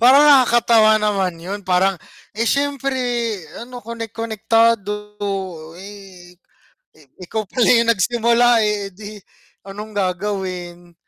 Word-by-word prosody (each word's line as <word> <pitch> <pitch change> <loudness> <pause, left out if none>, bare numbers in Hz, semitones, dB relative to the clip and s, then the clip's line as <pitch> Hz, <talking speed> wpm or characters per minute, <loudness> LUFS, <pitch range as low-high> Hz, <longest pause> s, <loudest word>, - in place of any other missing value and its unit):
Parang 270 +4 +7
nakakatawa 235 -5 +5
naman 195 -5 -1
yun 200 +4 -6
parang, 185 +1 +2 0.4
eh, 230 +1 -1
syempre 280 -1 -1 0.7
ano 245 +1 -9
konek 230 0 -7
konektado 220 -2 0 0.6
eh, 190 -2 -13 0.9
ikaw 215 +4 -3
pala 245 +4 +1
yung 230 -1 +3
nagsimula 235 +3 +2 0.2
eh, 205 -1 -1
di 210 +1 -10 0.5
anong 210 +2 -8
gagawin. 180 -3 -4
210 Hz, 105 wpm, -19 LUFS, 195-235 Hz, 0.9 s, Parang